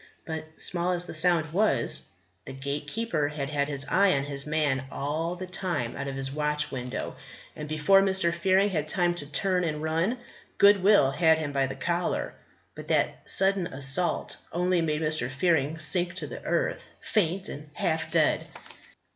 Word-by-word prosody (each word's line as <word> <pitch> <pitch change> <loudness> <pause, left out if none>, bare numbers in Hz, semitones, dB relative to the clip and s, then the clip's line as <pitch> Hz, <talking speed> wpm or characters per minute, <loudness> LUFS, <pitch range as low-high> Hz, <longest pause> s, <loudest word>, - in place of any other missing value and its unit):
But 160 -1 -7
small 180 0 0
as 175 0 -1
the - - -7
sound 165 -1 +3
was, 210 +4 +1 0.4
the 135 - -8
Gatekeeper 150 - -3
had 145 -1 -5
had 145 -1 0
his 140 -1 +3
eye 195 0 +3
on 135 - -1
his 140 0 -3
man 145 -4 0
all 160 +5 -3
the 185 +1 -6
time 180 -9 -3
out 140 0 -5
of 135 - -5
his 135 0 -3
watch 150 0 -1
window; 125 -1 -5 0.4
and 150 0 -7
before 155 +6 +4
Mr. 190 -3 +2
Fearing 190 +4 +2
had 155 -4 -2
time 175 +1 +1
to 145 -5 -6
turn 180 +4 +1
and 155 -3 -2
run, 165 +10 0 0.4
Goodwill 200 -7 +5
had 160 +1 +3
him 155 -2 -3
by 135 -1 0
the 130 - -6
collar. 175 0 -2 0.4
But - - -10
that - - 0
sudden 195 -2 +5
assault 140 +6 0
only 180 0 +1
made 155 -1 -1
Mr. 155 -5 0
Fearing 150 +1 0
sink 175 +4 0
to 185 - -2
the - - -8
earth, - - -1
faint 195 -1 -1
and 150 +1 -9
half 160 -1 -1
dead. - - +2
160 Hz, 170 wpm, -27 LUFS, 145-180 Hz, 0.4 s, Goodwill